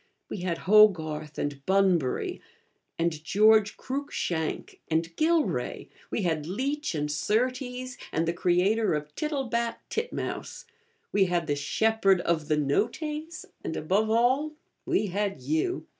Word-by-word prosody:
We - - -4
had 175 -2 -2
Ho 215 +3 +9
garth, 155 -5 -6
and 145 -1 -3
Bunbury, 190 -8 +2 0.6
and 165 -2 -1
George 215 +3 +4
Cruikshank, 255 - -3
and 165 +1 -1
Gilray; 325 0 0 0.2
we 215 - -2
had 160 -3 -1
Leech 275 - -2
and 150 -1 -1
Surtees, 250 - -1
and 160 +1 0
the 170 - +1
creator 185 +4 +2
of 150 0 -5
Tittlebat 250 - -1 0.2
Titmouse; 475 +1 -4 0.5
we 200 -1 +4
had 175 -2 0
the 145 - 0
Shepherd 195 +6 +2
of 160 -3 0
the 155 - +2
'Noctes,' 300 - -1 0.2
and, 160 - -3
above 200 +7 +1
all, 255 +7 +2 0.3
we - - +2
had 200 -3 -2
you. 155 - -1
195 Hz, 130 wpm, -27 LUFS, 160-245 Hz, 0.6 s, Ho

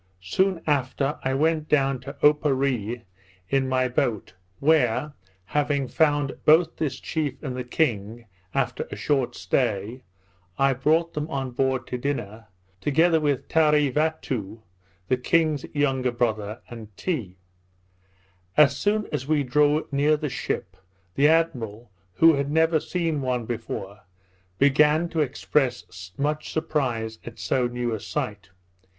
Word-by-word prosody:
Soon 185 - 0
after 140 -1 0
I 130 0 0
went 155 +1 +1
down 135 -3 +2
to 135 +3 -8
Oparree 135 -6 +2 0.5
in 135 -1 +1
my 130 0 +2
boat, 120 -5 -1 0.3
where, 150 -1 +2 0.3
having 145 +3 0
found 145 -2 +1
both 160 +2 +4
this 155 -4 -2
chief 150 -5 -2
and 130 -4 -4
the 125 - -3
king, 120 -4 -1 0.3
after 125 -1 -1
a - - -6
short 130 -4 0
stay, 105 +3 -1 0.6
I 135 0 +3
brought 160 +6 +1
them 150 +1 -3
on 135 -4 -3
board 130 +1 0
to 125 - -4
dinner, 115 -6 -4 0.3
together 160 - +3
with 145 -4 -1
Tarevatoo, 150 - +1 0.4
the 130 - +2
king's 155 +2 +1
younger 135 -3 0
brother, 110 -2 -2
and 115 -3 -9
Tee. 115 - -3 1.2
As 140 -3 +6
soon 210 +8 0
as 135 - -3
we 150 -2 +2
drew 150 +4 +2
near 145 +2 +3
the 150 -1 -3
ship, 95 -7 -4 0.4
the 140 +7 +4
admiral, 120 -10 0 0.2
who 165 0 +6
had 140 -1 -1
never 160 +1 +3
seen 165 -3 -2
one 125 -3 -1
before, 105 -3 -5 0.6
began 150 - +4
to 165 - -3
express 125 -9 -1
much 150 +2 -2
surprise 120 -8 -2
at 120 - -9
so 125 -2 0
new 120 -1 -2
a 110 - -3
sight. 105 -3 -4
135 Hz, 135 wpm, -25 LUFS, 120-150 Hz, 1.2 s, As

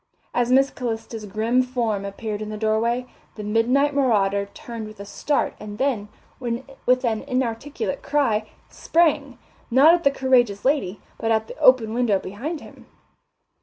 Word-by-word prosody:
As 245 0 +1
Miss 270 +1 +4
Calista's 225 -2 -5
grim 225 +5 +1
form 235 -6 -1
appeared 210 +1 -5
in 215 - -5
the 215 - -5
doorway, 225 +3 0 0.3
the 210 - -7
midnight 245 +7 +2
marauder 200 -7 +2
turned 225 +1 -8
with 215 -1 -13
a 200 - -7
start 285 +8 -1
and 210 0 -8
then, 245 -5 0 0.3
with 255 +1 -1
an 220 -2 0
inarticulate 260 +3 -3
cry, 225 -7 0 0.2
sprang, 295 -6 +1 0.3
not 275 +7 +7
at 345 -1 +1
the 280 - +5
courageous 250 -7 +2
lady, 260 -9 +1 0.2
but 225 - -1
at 220 -1 +1
the - - -9
open 235 -4 +5
window 235 -4 +2
behind 255 - -5
him. - - -14
235 Hz, 155 wpm, -23 LUFS, 215-265 Hz, 0.3 s, not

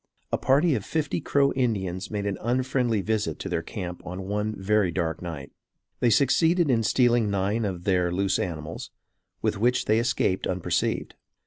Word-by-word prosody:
A - - +2
party 145 +5 +3
of 110 -6 -1
fifty 155 +2 -2
Crow 140 -1 +2
Indians 100 -8 -1
made 105 -1 -3
an 100 -2 -2
unfriendly 125 -2 0
visit 105 -6 -1
to - - -6
their 85 - -1
camp 90 0 -6
on 90 +2 -6
one 105 +2 -1
very 100 0 +2
dark 85 -2 -2
night. 80 -6 -6 0.5
They 120 - +3
succeeded 160 +6 +3
in 115 -2 +3
stealing 120 -1 +3
nine 100 +3 0
of 90 -3 -4
their 90 -3 +1
loose 95 +2 +1
animals, 80 -4 -5 0.5
with - - 0
which 125 +3 +2
they 110 +1 +3
escaped 115 -5 0
unperceived. 90 -1 -1
105 Hz, 165 wpm, -26 LUFS, 90-120 Hz, 0.5 s, party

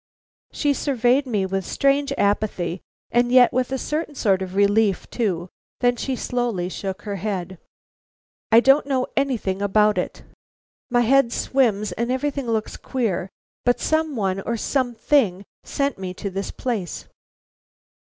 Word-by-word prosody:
She 290 -1 +1
surveyed 265 0 +1
me 210 -6 0
with 190 0 -2
strange 275 +6 +1
apathy, 195 -4 0 0.3
and 240 +1 +2
yet 250 -1 +6
with 255 +1 0
a 265 - 0
certain 300 +2 -3
sort 195 -7 +2
of 185 0 -5
relief 205 0 +2
too. 185 -7 -1 0.3
Then 245 -1 +3
she 260 +2 -2
slowly 235 -8 -2
shook 195 +1 -5
her 205 -2 -4
head. 190 -2 -4 0.9
"I 225 +1 +8
don't 270 +2 +4
know 260 -2 +1
anything 235 -9 -1
about 210 +1 +3
it. - - -5 0.7
My 240 -1 +3
head 240 0 +4
swims 215 -7 +1
and 235 +7 -2
everything 275 0 -2
looks 220 -2 -2
queer, 205 -8 -2 0.3
but 245 0 +2
some 315 -2 0
one 195 -3 -1
or 235 +3 -2
something 240 -5 +1 0.2
sent 280 -6 -2
me 185 -1 -5
to 200 +1 -5
this 195 +1 -4
place." 215 - -4
230 Hz, 145 wpm, -23 LUFS, 195-260 Hz, 0.9 s, I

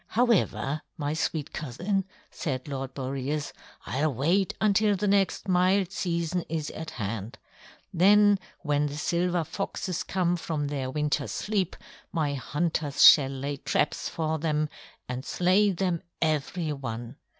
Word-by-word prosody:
"However, 210 - +1 0.2
my 145 0 -1
sweet 155 -2 -2
cousin," 180 - -2 0.3
said 130 -4 -3
Lord 135 -2 -5
Boreas, 135 +2 -3 0.3
"I'll 145 +8 0
wait 170 - +1
until 210 0 +3
the 205 +2 -1
next 195 0 +2
mild 185 +1 +3
season 170 -1 -1
is 155 -1 -2
at 160 0 -6
hand. 110 +3 -4 0.6
Then 205 +3 +6 0.2
when 150 -2 +1
the 145 0 -6
silver 175 +2 +1
foxes 185 0 -3
come 175 -2 0
from 150 -3 -2
their 135 -3 -2
winter's 150 +1 -1
sleep, 205 -4 -1 0.4
my 150 -4 0
hunters 150 +1 +1
shall 135 -3 +8
lay 140 +1 -4
traps 145 - 0
for 160 -1 -2
them 155 -1 0 0.4
and 125 +1 -4
slay 185 +7 +3
them 180 -2 -1 0.2
every 155 +1 0
one. 120 -1 -6
155 Hz, 135 wpm, -27 LUFS, 140-180 Hz, 0.6 s, shall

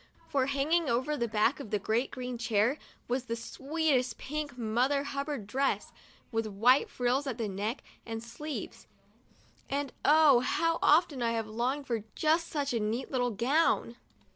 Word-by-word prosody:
For, 270 -3 +1
hanging 290 +4 +1
over 255 +6 +1
the 235 -4 -1
back 220 +5 +2
of 275 - -7
that 205 -1 -1
great, 230 +4 +1
green 250 -2 -5
chair 235 +4 +1 0.3
was 250 +1 -1
the 230 - -2
sweetest 270 0 -1
pink 295 -2 -5
Mother 250 +5 +1
Hubbard 280 -4 -4
dress, 270 +6 -1 0.4
with 225 -1 -1
white 230 +6 +4
frills 255 +3 0
at 255 - -3
the 225 -3 -2
neck 205 +6 -3 0.2
and 225 -1 -5
sleeves; 290 +6 -7 0.8
and, 280 -1 -2
oh, 295 -4 +6
how 330 +3 +1
often 300 -4 +4
I 230 -1 +1
have 225 -1 -1
longed 245 +6 -2
for 230 -5 -2
just 325 +2 +2
such 285 -4 -2
a 230 - +1
neat 220 +4 -2
little 245 -2 +1
gown! 240 +2 +1
255 Hz, 165 wpm, -30 LUFS, 230-285 Hz, 0.8 s, oh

